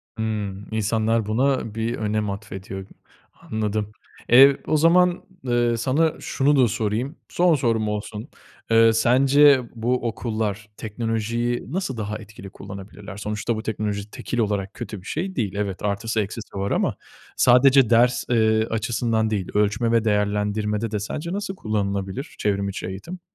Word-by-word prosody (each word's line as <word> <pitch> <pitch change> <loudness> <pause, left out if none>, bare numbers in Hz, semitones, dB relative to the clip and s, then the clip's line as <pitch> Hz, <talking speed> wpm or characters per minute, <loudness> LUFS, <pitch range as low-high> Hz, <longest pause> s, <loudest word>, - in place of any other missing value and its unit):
Hımm. 105 -3 -3
İnsanlar 110 +1 +1
buna, 115 0 0
bir 115 +1 -1
önem 105 -1 -1
atfediyor, 95 -1 -7 0.6
anladım. 105 -1 -2 0.4
E, 135 +3 +8
o 155 - +2
zaman, 175 +3 +4 0.2
eee, 120 -2 +1
sana 145 +7 +1
şunu 145 +2 +1
da 130 -3 +5
sorayım. 110 - -2
Son 175 -2 +3
sorum 115 -5 0
olsun. 105 +2 -4 0.4
Eee, 115 0 +6
sence 135 +4 +5
bu 120 +1 0
okullar, 110 -2 -3
teknolojiyi 115 +2 -2
nasıl 170 -8 -2
daha 105 -1 -3
etkili 105 -3 -11
kullanabilirler? 100 +1 -10
Sonuçta 105 +3 -2
bu 110 - -5
teknoloji 105 -2 -3
tekil 120 - -4
olarak 100 -3 -1
kötü 105 -4 -7
bir - - -19
şey 190 +4 -3
değil. 105 -6 -2
Evet, 100 -2 -3
artısı 110 +3 -1
eksisi 105 +2 -7
var 100 +1 -2
ama - - +1 0.4
sadece 130 0 +5
ders, 120 +1 +4
eee, 110 -2 +3
açısından 115 0 0
değil, 100 -4 -2
ölçme 105 +3 +1
ve 115 -1 +3
değerlendirmede 105 +1 0
de 105 - -1
sence 155 - -4
nasıl 200 -1 -3
kullanılabilir 100 - -3
çevrim 100 -1 0
içi 95 - -5
eğitim? 95 - -7
110 Hz, 145 wpm, -23 LUFS, 105-120 Hz, 0.6 s, E